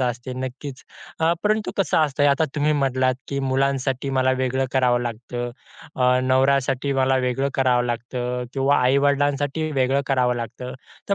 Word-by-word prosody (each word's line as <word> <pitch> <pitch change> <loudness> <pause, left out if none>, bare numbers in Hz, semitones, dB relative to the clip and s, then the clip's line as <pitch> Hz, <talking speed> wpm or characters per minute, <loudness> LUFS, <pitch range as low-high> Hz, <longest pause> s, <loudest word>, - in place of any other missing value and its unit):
असते", 125 0 -2
नक्कीच. 130 +1 -8 0.4
अ, 165 +1 +3
परंतु 215 0 +1
कसं 195 -4 +1
असतं 145 -2 +2
आता 140 +3 +3
तुम्ही 150 +1 +1
म्हटलात, 130 -3 +1
की 140 - -2
"मुलांसाठी 135 0 0
मला 130 0 +3
वेगळं 130 +1 0
करावं 125 -2 +2
लागतं". 120 +1 -5 0.5
अ, 125 0 +3
"नवऱ्यासाठी 135 +1 +2
मला 135 0 +2
वेगळं 135 +3 0
करावं 125 -2 +2
लागतं" 125 +1 -3
किंवा 135 +1 +2
"आई-वडिलांसाठी 145 +3 +1
वेगळं 135 0 +2
करावं 125 -2 +2
लागतं". 120 +2 -6 0.4
तर 200 - +3
130 Hz, 145 wpm, -22 LUFS, 125-140 Hz, 0.5 s, अ